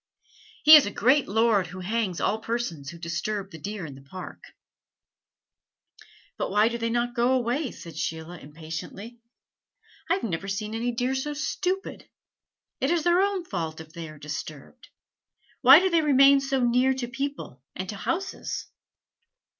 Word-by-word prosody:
"He 310 +1 +11
is 295 -8 +7
a - - -3
great 260 +8 +3
lord 215 -2 +2
who 185 +2 -9
hangs 200 -2 -2
all 215 - 0
persons 220 -12 -4
who 170 - -9
disturb 185 +4 -4
the 160 - -10
deer 200 +2 -5
in 145 - -8
this 135 0 -15
Park." 185 +2 -9 2.0
"But - - -2
why 210 +3 +3
do 235 0 -4
they 230 0 -1
not 240 +1 -1
go 240 +2 +2
away?" 255 +3 0
said 165 -7 -11
Sheila 160 +2 -4
impatiently. 165 - -8 0.9
"I - - +4
have 385 - -6
never 190 -1 -3
seen 210 +2 -3
any 235 +2 -1
deer 250 +2 -1
so 290 +3 -3
stupid. 365 +6 -3 0.7
It 270 - 0
is 340 -2 +1
their 350 +1 +4
own 395 -3 0
fault 165 - -4
if 160 0 -12
they 165 -2 -7
are 155 - -12
disturbed: 150 - -8 0.7
why 265 +2 +10
do 375 0 +1
they 335 -1 +4
remain 275 -1 +6
so 270 -1 0
near 250 +2 +3
to 255 -2 -4
people 270 - -5
and 185 - -5
to 210 - -4
houses?" 365 - -4
230 Hz, 165 wpm, -26 LUFS, 170-265 Hz, 2.0 s, He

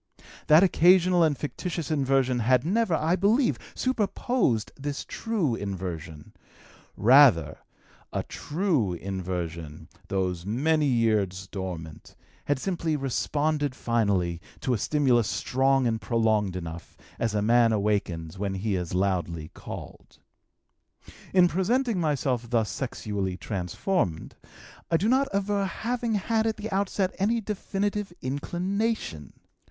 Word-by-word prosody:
That 155 +4 +7
occasional 180 0 +5
and 155 -4 +3
fictitious 165 +1 -4
inversion 135 -3 +2
had 125 +3 +3
never, 200 0 +2
I 160 +3 +1
believe, 220 +7 +2 0.2
superposed 230 - 0
this 140 0 -5
true 210 - -1
inversion; 90 -7 -6 0.6
rather 120 - +5 0.5
a - - -2
true 150 - -1
inversion, 85 -4 -5 0.2
those 90 -3 -1
many 145 - +1
years 105 -7 +1
dormant, 90 -5 -7 0.3
had 145 - +1
simply 165 0 -1
responded 145 +1 -1
finally 100 -9 0 0.2
to 130 - 0
a - - +1
stimulus 125 -4 +2
strong 135 +1 +1
and 110 -2 0
prolonged 110 -5 +1
enough, 85 -1 -7 0.2
as 115 -2 -1
a 105 - +1
man 115 +1 +4
awakens 100 -5 -1
when 100 -1 -2
he 100 +1 -1
is 90 -1 -3
loudly 85 -4 -1
called. - - -10 1.1
"In 180 -2 +6
presenting 225 +5 +1
myself 135 -7 -1
thus 115 -5 +1
sexually 100 -6 -3
transformed, 95 - -2 0.6
I 165 - +3
do 200 - 0
not 265 +3 +3
aver 200 0 0
having 230 +3 -2
had 220 +2 +1
at 220 - -1
the 215 +1 -6
outset 195 -1 0
any 225 +5 +2
definitive 205 -1 -3
inclination. 175 - -2
130 Hz, 120 wpm, -27 LUFS, -, 1.1 s, That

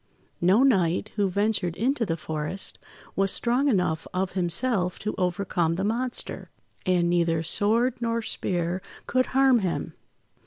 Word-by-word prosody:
No 190 +8 +5
knight, 195 -6 +2
who 200 -2 +1
ventured 200 -3 0
into 240 +3 0
the 165 - -1
forest, 155 +5 -3 0.4
was 195 0 +2
strong 245 +4 +1
enough 180 - +1
of 185 0 0
himself 180 +1 0
to 215 - -3
overcome 180 -2 0
the 190 - -2
monster; 240 +4 -1 0.4
and 180 -2 +3
neither 170 -2 +1
sword 230 +8 +1
nor 230 -1 -1
spear 175 -3 -2 0.2
could 255 0 +1
harm 265 -2 +4
him. 185 -4 -2
195 Hz, 140 wpm, -26 LUFS, 175-230 Hz, 0.4 s, No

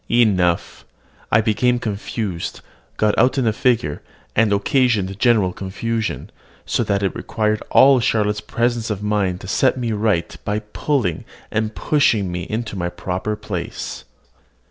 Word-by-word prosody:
Enough, 95 -8 +2 0.5
I 110 - +5
became 115 +3 +2
confused, 105 -5 -4 0.4
got 105 -1 +2
out 125 +4 +3
in 130 - +2
the 110 - +2
figure, 110 - +1 0.3
and 115 -1 +3
occasioned 100 -2 +1
general 105 -7 +3
confusion; 110 +4 -3 0.3
so - - 0
that 100 0 0
it 95 - 0
required 110 -1 -1
all 135 -1 +6
Charlotte's 105 -2 +1
presence 120 -1 -1
of 105 -1 -3
mind 100 -3 0
to - - -8
set 130 +7 +2
me 120 -2 -2
right 105 -5 0
by 105 0 -1
pulling 105 - -1 0.3
and 110 0 -1
pushing 110 -11 +2
me 90 0 -4
into 110 -1 -3
my 85 -2 -2
proper 90 +4 -3
place. 105 -5 -5
105 Hz, 145 wpm, -20 LUFS, 95-115 Hz, 0.5 s, all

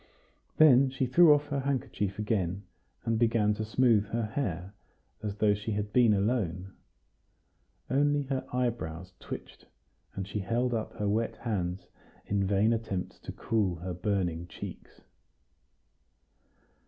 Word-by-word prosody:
Then 135 -3 +7
she 130 0 -1
threw 155 +6 +6
off 145 0 +3
her 140 -1 -1
handkerchief 125 -7 -2
again, 100 -3 -1 0.4
and 115 -1 +1
began 115 -3 +3
to 110 - -3
smooth 110 -1 +3
her 115 +2 -1
hair, 100 - -3 0.5
as 105 -1 -3
though 105 -1 +3
she 105 +2 -3
had 105 0 -3
been 120 -3 +5
alone. 100 -3 0 1.1
Only 145 +2 +2
her 135 -1 -2
eyebrows 95 -8 -2
twitched, - - -9 0.5
and 95 -1 -4
she 105 +1 -3
held 120 +5 0
up 110 -2 -3
her 105 - -2
wet 110 +3 0
hands 95 -6 -3 0.4
in 100 -1 0
vain 105 +3 +3
attempts 110 -5 -4
to - - -7
cool 105 -6 0
her 90 +2 -5
burning 90 -2 -1
cheeks. - - -10
105 Hz, 135 wpm, -29 LUFS, 95-125 Hz, 1.1 s, Then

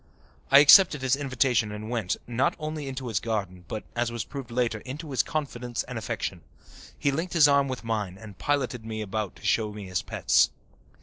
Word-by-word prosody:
I 135 - +8
accepted 150 -2 +7
his 130 0 +3
invitation 130 -5 +1
and 105 +1 -6
went, 115 -6 -1
not 120 +2 0
only 155 -2 -5
into 130 -1 -5
his 110 -4 0
garden 95 -6 -4
but, 110 - -5
as 120 0 0
was 120 -2 -3
proved 135 -1 -8
later, 120 -2 0
into 145 +6 -8
his 130 - +3
confidence 125 -6 -3
and 125 - -8
affection. 100 -5 -4 0.6
He 140 - +1
linked 165 +6 -3
his 155 -3 +7
arm 140 -1 +3
with 130 -2 -5
mine 105 -5 -3
and 105 -1 -11
piloted 130 -5 -1
me 110 -1 -5
about 105 -1 -3
to - - -14
show 105 +1 +1
me 105 -1 -8
his 90 -1 -2
pets. - - +2
120 Hz, 195 wpm, -27 LUFS, 110-140 Hz, 0.6 s, I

